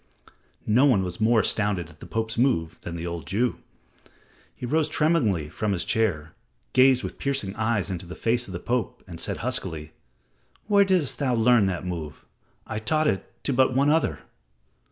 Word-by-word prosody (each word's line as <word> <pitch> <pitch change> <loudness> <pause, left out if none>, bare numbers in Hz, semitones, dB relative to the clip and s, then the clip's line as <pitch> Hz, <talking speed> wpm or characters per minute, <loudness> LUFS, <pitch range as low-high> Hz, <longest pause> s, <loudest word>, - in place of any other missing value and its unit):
No 125 +7 +4
one 105 -8 +3
was 90 +4 -5
more 110 0 +4
astounded 100 -6 0
at 75 - -20
the - - -10
Pope's 110 0 -2
move 85 -10 +1
than 85 - -6
the 85 0 -5
old 85 -4 -5
Jew. 115 +5 0 1.0
He - - -6
rose 155 +4 +1
tremblingly 135 - +1
from 105 +6 -2
his 85 -2 -1
chair, 85 -10 0 0.4
gazed 130 0 +5
with - - -6
piercing 135 -8 -2
eyes 110 -3 0
into 90 -1 -5
the 90 - -8
face 120 +2 0
of - - -9
the 85 - -5
Pope 125 +3 -2
and 85 -3 -9
said - - -2
huskily, 75 -1 -3 0.7
"Where 200 -1 +4
didst 185 -7 +1
thou 130 -4 +1
learn 115 -2 +4
that 90 -1 -3
move? 85 -5 -6 0.4
I 110 - -4
taught 155 +8 +1
it 95 -10 -1
to 140 - 0
but 130 0 +3
one 140 +2 +4
other." 160 +1 +1
110 Hz, 180 wpm, -25 LUFS, 90-130 Hz, 1.0 s, gazed